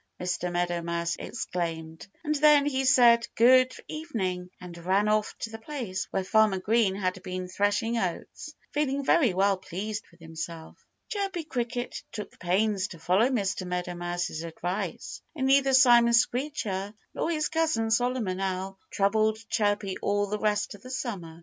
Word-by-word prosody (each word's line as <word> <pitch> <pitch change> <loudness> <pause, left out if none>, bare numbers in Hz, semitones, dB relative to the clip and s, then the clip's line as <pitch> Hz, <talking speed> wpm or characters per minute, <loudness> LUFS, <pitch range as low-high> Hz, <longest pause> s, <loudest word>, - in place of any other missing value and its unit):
Mr. 180 0 -2
Meadow 175 0 -1
Mouse 170 0 -2
exclaimed. 165 -7 -4 0.2
And 305 -1 0
then 295 -1 +5
he 270 -2 0
said 240 -3 +6
good 255 +2 +6 0.2
evening 190 - -3
and 180 -1 -9
ran 190 +4 +1
off 215 0 +1
to 225 - -4
the 225 - -7
place 225 -6 -4
where 190 - -1
Farmer 215 0 +3
Green 205 0 +2
had 185 -1 -2
been 185 -1 -5
threshing 205 +5 0
oats, 205 - -5 0.2
feeling 280 -2 -1
very 250 - +3
well 195 +1 +3
pleased 205 +4 -5
with 170 - -23
himself. 160 0 -8 0.3
Chirpy 390 -5 -2
Cricket 245 -4 -3
took 210 -2 -8
pains 195 +2 +1
to 170 - -10
follow 190 +9 +3
Mr. 195 -7 -1
Meadow 180 0 -3
Mouse's 175 -2 -3
advice. 175 +4 -4
And 265 -4 -1
neither 270 0 +4
Simon 240 -2 +6
Screecher 230 -5 0 0.2
nor - - -1
his 305 -2 0
cousin 310 -9 0
Solomon 230 -5 0
Owl 190 0 -3
troubled 215 +2 +2
Chirpy 205 -2 0
all 205 0 +1
the 210 +1 -3
rest 210 0 0
of 205 - -13
the 255 - -11
summer. 195 -11 -5
205 Hz, 155 wpm, -27 LUFS, 185-245 Hz, 0.3 s, said